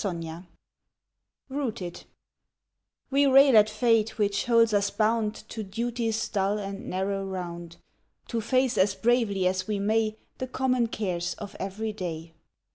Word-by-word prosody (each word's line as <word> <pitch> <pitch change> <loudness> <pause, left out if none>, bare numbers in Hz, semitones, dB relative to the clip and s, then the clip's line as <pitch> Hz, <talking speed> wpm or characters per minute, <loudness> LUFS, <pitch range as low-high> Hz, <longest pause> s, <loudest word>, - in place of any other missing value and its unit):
ROOTED 180 -5 -2
45 170 +3 -9 1.0
ROOTED 235 -11 -4 1.1
WE 280 +1 +4
rail 270 -1 +7
at 215 0 +7
fate 225 0 +2
which 205 -1 0
holds 230 -2 +4
us 200 -1 +2
bound 220 0 +1
To 220 - -5
duty's 225 +2 -2
dull 200 0 0
and 195 -1 -6
narrow 195 +1 -1
round, 175 -3 -6 0.5
To 230 -2 -1
face 255 +2 +1
as 195 +1 +3
bravely 225 -5 +1
as 185 0 0
we 210 -1 -1
may 215 +2 +1 0.2
The 255 - -3
common 255 -2 +1
cares 180 -6 -2
of 205 -1 -9
every 210 +3 -3
day. 165 -4 -6
210 Hz, 140 wpm, -27 LUFS, 190-230 Hz, 1.1 s, rail